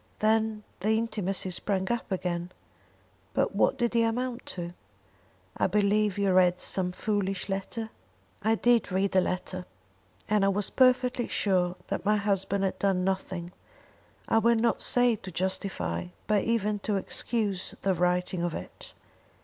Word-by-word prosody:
Then 220 0 +1 0.2
the 215 +4 +2
intimacy 200 -4 -1
sprang 190 +1 -1
up 235 -3 -3
again; 180 -1 -2 0.8
but - - +1
what - - +3
did 240 -2 0
it 230 - +5
amount 240 +2 -1
to? 175 -1 -5 0.8
I - - +2
believe 205 +1 +2
you 200 -2 +2
read 180 -1 +4
some 180 -1 -1
foolish 195 0 -2
letter?" 220 +4 -3 0.5
"I 220 +2 +3
did 235 -2 +3
read 190 +1 0
a 185 - +6
letter, 185 0 -3 0.6
and 210 -1 +2
I - - +4
was 200 +1 0
perfectly 255 -1 +3
sure 180 -3 +1
that - - -2
my 210 +2 +3
husband 200 -1 0
had 190 - -1
done 195 -2 +1
nothing, 190 -2 -2 0.8
I 225 - +4
will 235 +1 +4
not 230 +1 +1
say 245 -2 +4
to 190 - -9
justify, 125 - -2 0.2
but 210 -2 +2
even 215 -2 +1
to 205 +1 -1
excuse 200 -1 -2
the 195 - +3
writing 180 0 0
of 175 -1 -1
it. - - -9
200 Hz, 150 wpm, -28 LUFS, 185-220 Hz, 0.8 s, a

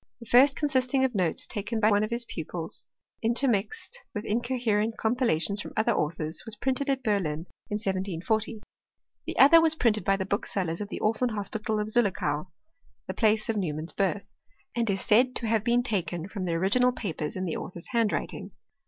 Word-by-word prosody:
The 235 - -11
first 265 +5 +6
consisting 265 -2 +1
of 255 - -1
notes 180 -6 0
taken 220 +1 -3
by 215 0 +4
one 205 +1 +3
of 215 - -2
his 235 0 -1
pupils, 165 -3 -5 0.3
intermixed 245 - -1 0.2
with 210 +1 -4
incoherent 230 -2 0
compilations 220 - +1
from - - -8
other 220 - +3
authors, 155 +1 -2
was 225 - -3
printed 265 +5 -1
at 265 -1 0
Berlin 175 -8 0 0.2
in 210 - -2
1740. 200 +2 -2 0.6
The - - -4
other 330 +5 +8
was 320 -1 +5
printed 220 -7 +2
by 195 -1 +2
the 190 - -2
booksellers 195 -3 -2
of 205 - -5
the - - -5
Orphan 225 +3 +1
Hospital 215 +1 -2
of 210 - -1
Zullichau 190 -9 0 0.6
(the - - -4
place 215 -1 +2
of 225 - -1
Neu 180 -7 -1
mann's 155 +2 -6
birth), 195 0 0 0.5
and 235 -2 0
is 195 -1 0
said 250 +4 +3
to 235 - -2
have 220 -1 +1
been 240 +1 +2
taken 175 -7 -2
from 195 -2 -5
the 170 - -1
original 205 +9 +3
papers 165 -10 -4
in 185 0 -2
the 165 - -2
author's 175 -2 -8
handwriting. 230 -3 -1
215 Hz, 185 wpm, -27 LUFS, 190-240 Hz, 0.6 s, other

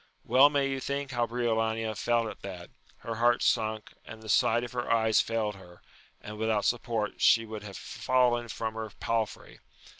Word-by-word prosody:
Well 135 +2 +6
may 140 -2 +1
you 135 -1 -2
think 140 +1 -3
how 120 -2 0
Briolania 115 -2 -1
felt 120 +1 +1
at - - -9
that; 90 -3 -8 0.3
her 115 -1 -5
heart 120 +1 +3
sunk, 110 -1 0
and 110 0 -11
the 110 - -9
sight 115 +3 +3
of 120 - -6
her 125 -1 -3
eyes 110 -1 +4
failed 110 -2 -2
her, 90 -2 -16 0.4
and 105 0 -9
without 110 -2 0
support 115 -3 -1
she 115 0 +5
would 110 -1 -7
have 100 -2 -9
fallen 125 -2 +1
from 110 0 -4
her 110 0 -5
palfrey. 115 -2 -3
115 Hz, 180 wpm, -29 LUFS, 110-120 Hz, 0.4 s, Well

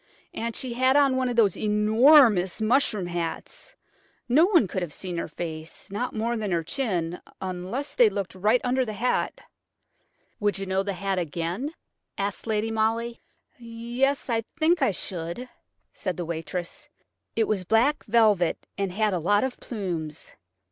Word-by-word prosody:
And 230 0 -3
she 255 -2 -3
had 260 +2 +3
on 275 -2 +4
one 260 -1 +1
of 245 - -2
those 210 -6 +4
enormous 215 - +5
mushroom 220 -3 +2
hats; 175 - -5 0.5
no 285 +7 +5
one 345 - +4
could 185 - -3
have 170 -4 -5
seen 180 -2 -5
her - - -3
face–not 170 +8 -5
more 230 +2 0
than 215 -3 -2
her 170 -2 0
chin–unless 185 - -3
they 480 -3 +6
looked 195 - -4
right 210 +6 +2
under 255 +1 +1
the 215 -3 -4
hat." 240 +5 -1 1.0
"Would 205 -2 +1
you 195 - -4
know 190 0 0
the 200 0 -3
hat 195 0 -1
again?" 175 - -3 0.4
asked 200 +3 -3
Lady 220 0 0
Molly. 225 +2 -1 0.4
"Yes–I 235 +1 -1 0.2
think 325 +1 +3
I 265 - +4
should," 180 +4 -4 0.5
said 185 -5 -4
the 175 - -3
waitress. 175 - -5 0.5
"It 225 -1 +2
was 200 -4 0
black 230 +10 +2
velvet 210 -6 +3
and 195 -2 -1
had 210 +2 +1
a 180 - 0
lot 205 +5 +2
of 260 -1 -3
plumes. 170 - -5
215 Hz, 155 wpm, -26 LUFS, 180-245 Hz, 1.0 s, they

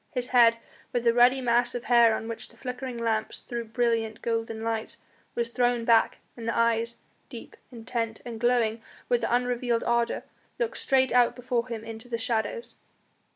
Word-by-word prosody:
His 250 0 -2
head, 235 -2 +6 0.3
with 245 - -1
the 235 -1 +4
ruddy 245 +2 +5
mass 240 0 +2
of 245 - -4
hair 235 -3 +5
on 225 - -5
which 230 -1 -6
the - - -20
flickering 250 -1 -5
lamps 225 -2 -1
threw 235 -1 -5
brilliant, 230 -1 -1
golden 225 -1 -2
lights, 225 -1 -3 0.4
was 235 -1 -1
thrown 245 -1 +1
back, 230 -1 +4 0.2
and 230 -1 -7
the 230 - -1
eyes, 230 0 +1 0.3
deep, 235 -4 -10 0.2
intent, 230 -1 -4
and 235 -2 -6
glowing 235 -2 +1 0.3
with 485 -1 +2
unrevealed 245 -1 0
ardour, 235 0 0 0.3
looked 480 -2 -2
straight 260 -1 +2
out 245 -1 +4
before 245 -1 -2
him 230 -3 -5
into 225 +1 -9
the 230 - -1
shadows. 230 - -2
235 Hz, 170 wpm, -27 LUFS, 230-245 Hz, 0.4 s, head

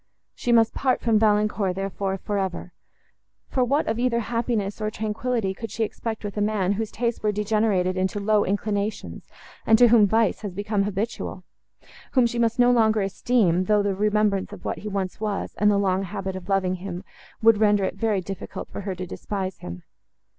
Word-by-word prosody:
She 245 - -2
must 230 -1 +4
part 260 -2 +1
from 225 -2 +2
Valancourt, 210 -3 +2
therefore, 195 0 -2
for 205 +1 -2
ever—for 190 +6 -6
what 280 +5 +1
of 225 +1 -1
either 240 -1 +1
happiness 230 -3 -2
or 215 - 0
tranquillity 220 -1 -2
could 225 +3 -7
she 225 - -2
expect 220 +1 -4
with 205 -1 -5
a - - 0
man, 205 -3 +1
whose 215 +1 -2
tastes 235 +1 -2
were 210 - +1
degenerated 210 -3 +1
into 190 +2 -1
low 210 +1 +2
inclinations, 205 +1 -3 0.3
and 220 - +5
to 240 0 +6
whom 220 -3 +6
vice 225 0 +1
was 205 -4 -5
become 205 0 0
habitual? 205 -2 -4 0.7
whom 255 -3 +5
she 235 0 -1
must 230 0 +1
no 245 0 +5
longer 220 -3 +3
esteem, 195 -3 +1
though 210 +1 +3
the 200 -1 0
remembrance 210 -1 +1
of - - -11
what - - -2
he 210 - -7
once 195 -3 -3
was, 210 -2 -2
and 210 - +5
the 205 - +3
long 190 -1 +1
habit 195 0 -4
of 185 0 -8
loving 185 -2 +1
him, 180 -1 -6 0.4
would 225 -2 +6
render 205 -2 +3
it - - -1
very 215 -4 0
difficult 195 +1 -7
for - - -6
her 195 -1 -4
to 180 +1 -5
despise 190 +1 -5
him. 90 0 -8
210 Hz, 190 wpm, -24 LUFS, 195-225 Hz, 0.7 s, to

